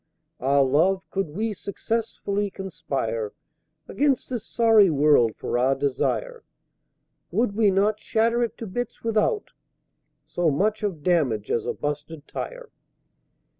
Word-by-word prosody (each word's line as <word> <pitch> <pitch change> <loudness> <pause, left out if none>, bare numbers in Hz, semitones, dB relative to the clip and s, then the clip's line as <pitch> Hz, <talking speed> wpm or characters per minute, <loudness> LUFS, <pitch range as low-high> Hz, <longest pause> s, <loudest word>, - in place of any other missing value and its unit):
Ah, 140 +2 +3
Love, 165 +8 +2
could 195 -4 -1
we 215 +8 -2
successfully 205 0 -2
conspire 140 - -4 0.5
Against 275 +2 0
this 240 -4 -3
sorry 225 -5 +5
World 145 -7 +4
for 120 - -2
our 130 +2 +3
desire, 145 - -1 0.9
Would 230 -2 +1
we 215 -2 +4
not 205 +2 +2
shatter 230 +3 +1
it 235 - -1
to 230 - -6
bits 235 +4 -5
without 230 - 0 0.7
So 175 -2 0
much 210 +9 +1
of 185 -8 -3
damage 140 - +1
as 115 - 0
a - - 0
busted 150 +1 -5
tire? - - -7
195 Hz, 130 wpm, -25 LUFS, 145-225 Hz, 0.9 s, sorry